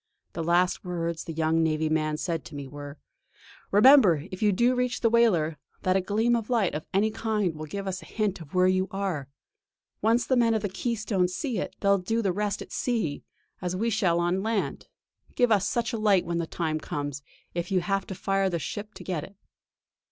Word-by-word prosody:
The 165 - -3
last 175 +2 +2
words 170 -2 -3
the - - -5
young 160 0 +1
navy 160 -1 +1
man 155 -1 0
said 165 -3 -2
to 150 - -10
me 140 -1 -6
were: 145 +1 -9 0.7
"Remember, 205 - +6
if 185 - -7
you 210 -1 +4
do 240 +6 +3
reach 250 0 -1
the 230 - +3
whaler, 175 -10 +3 0.2
that 185 0 +2
a 190 - +3
gleam 220 +5 +1
of 230 -1 -3
light 225 -7 +2
of 150 - -5
any 210 +3 +2
kind 215 -5 -1
will 155 0 -7
give 200 +6 -5
us 185 -1 -3
a - - -12
hint 210 -5 -2
of 160 +2 -11
where 180 0 +5
you 185 0 +2
are. 190 -8 -3 0.7
Once 230 +3 +3
the 260 - +2
men 230 -2 +3
of 220 - -1
the 205 - -1
Keystone 215 -3 0
see 225 - -3
it, - - -4
they'll 200 -1 +4
do 225 +6 -1
the 190 -3 +1
rest 205 +1 -2
at - - -17
sea; 220 - -1 0.4
as 180 0 -2
we 230 +5 0
shall 180 -6 +2
on 175 +2 +1
land. 220 -1 -2 0.5
Give 245 -2 +3
us 205 -1 +3
such 235 +1 -1
a 225 - -2
light 200 -4 +3
when 170 0 -1
the 165 - -2
time 160 -2 -2
comes 145 -2 -4 0.3
if 175 0 -3
you 190 -2 +2
have 195 +1 -1
to 190 - -5
fire 195 +1 +1
the 175 - -1
ship 210 +6 -6
to - - -9
get 175 -6 -3
it!" 200 - -11
190 Hz, 220 wpm, -27 LUFS, 165-215 Hz, 0.7 s, Remember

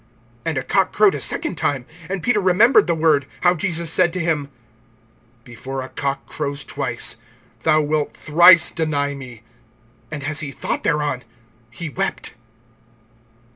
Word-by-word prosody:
(72)And 160 -3 -1
a - - -5
cock 190 +5 +1
crowed 210 -1 +4
a - - -3
second 175 - -2
time. 135 -4 -1 0.2
And 195 -2 -3
Peter 230 -4 +2
remembered 200 +7 +5
the 170 - +1
word, 155 -3 +2
how 175 0 +4
Jesus 170 -1 -1
said 175 0 +3
to 185 - -3
him: 155 -5 -1 0.9
Before 130 +2 -6
a 130 - -9
cock 140 -1 -3
crows 145 -2 -4
twice, 125 -4 -3 0.4
thou 155 +3 +3
wilt 150 0 -1
thrice 170 +2 +6
deny 145 -3 -1
me. 125 -5 -10 0.7
And 150 -3 -6
as 155 +2 -2
he 145 -3 -3
thought - - -3
thereon, 150 -5 -1 0.5
he 165 +8 -7
wept. 190 +6 -3
155 Hz, 150 wpm, -20 LUFS, 140-175 Hz, 0.9 s, thrice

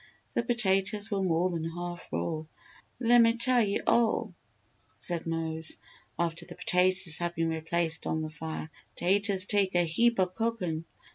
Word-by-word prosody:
The - - +2
potatoes 210 -2 +1
were 200 -1 0
more 180 0 +1
than 165 -2 -3
half 175 +1 -5
raw. 85 - -2 0.5
"Lemme 235 -1 +5
tell 250 0 +4
you 200 -2 0
all," 230 -3 +2 0.6
said 170 -2 -1
Mose, 160 -1 -3 0.4
after 170 -1 -1
the - - -11
potatoes 180 -2 +2
had 175 0 -2
been 165 0 0
replaced 165 +1 -1
on 160 0 -1
the 155 - -5
fire, 160 0 -6 0.2
"taters 195 +1 +2
take 200 -3 +1
a 175 - +5
heap 230 +7 +2
o' 185 - +5
cookin'. 185 -5 -2
180 Hz, 150 wpm, -29 LUFS, 165-205 Hz, 0.6 s, Lemme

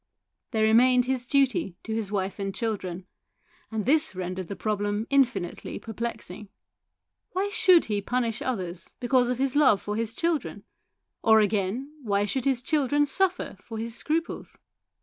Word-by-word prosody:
There 220 -2 0
remained 245 +3 +5
his 255 -1 -2
duty 260 -10 +2
to 220 - -4
his 220 -3 -2
wife 195 -1 -2
and 195 -1 -3
children, 190 -6 -3 0.6
and 220 -2 -3
this 300 -4 +2
rendered 185 0 -4
the 200 - -5
problem 205 +2 -1
infinitely 240 -11 0
perplexing. 220 -2 -6 0.8
Why 385 +2 0
should 370 -3 +5
he 205 -2 -1
punish 235 +1 -1
others 185 -8 -4
because 245 0 +2
of 250 - 0
his 270 +1 0
love 265 -9 +5
for 210 - -4
his 230 0 -2
children; 335 0 -1 0.6
or, 220 -1 +6
again, 215 +7 0
why 205 -4 +1
should 250 +6 -2
his 260 -3 +1
children 290 0 +2
suffer 365 - 0
for 225 - -7
his 230 +1 -3
scruples 320 +7 -2
230 Hz, 150 wpm, -27 LUFS, 205-265 Hz, 0.8 s, or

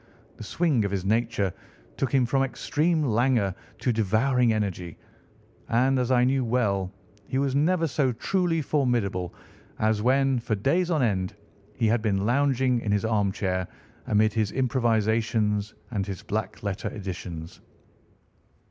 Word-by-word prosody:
The - - -8
swing 140 - +1
of 100 - -1
his 95 -1 -3
nature 110 -3 0 0.4
took 135 -3 -1
him 135 -3 +3
from 135 +3 +1
extreme 155 +4 0
languor 120 -5 +2 0.2
to 120 +2 0
devouring 115 +4 +2
energy; 95 -6 -3 0.7
and, 130 +3 +3
as 125 -1 0
I 125 -1 +4
knew 130 +1 +2
well, 100 -6 0 0.4
he 130 - -2
was 135 -1 +1
never 165 +4 +2
so 140 -3 +1
truly 165 +5 0
formidable 120 - 0 0.5
as 110 -1 +1
when, 135 +2 +2
for 115 -2 -1
days 170 - +1
on 155 -6 +2
end, 95 -3 0 0.4
he 115 - 0
had 110 +1 +2
been 100 -3 0
lounging 130 0 +2
in 105 - -2
his 105 +1 +1
armchair 95 -4 0 0.4
amid 110 0 +3
his 110 -3 0
improvisations 110 -4 +1 0.2
and 100 -4 -1
his 95 -3 -6
black 105 -1 -4
letter 100 -2 -3
editions. 90 -5 -7
115 Hz, 145 wpm, -26 LUFS, 100-130 Hz, 0.7 s, I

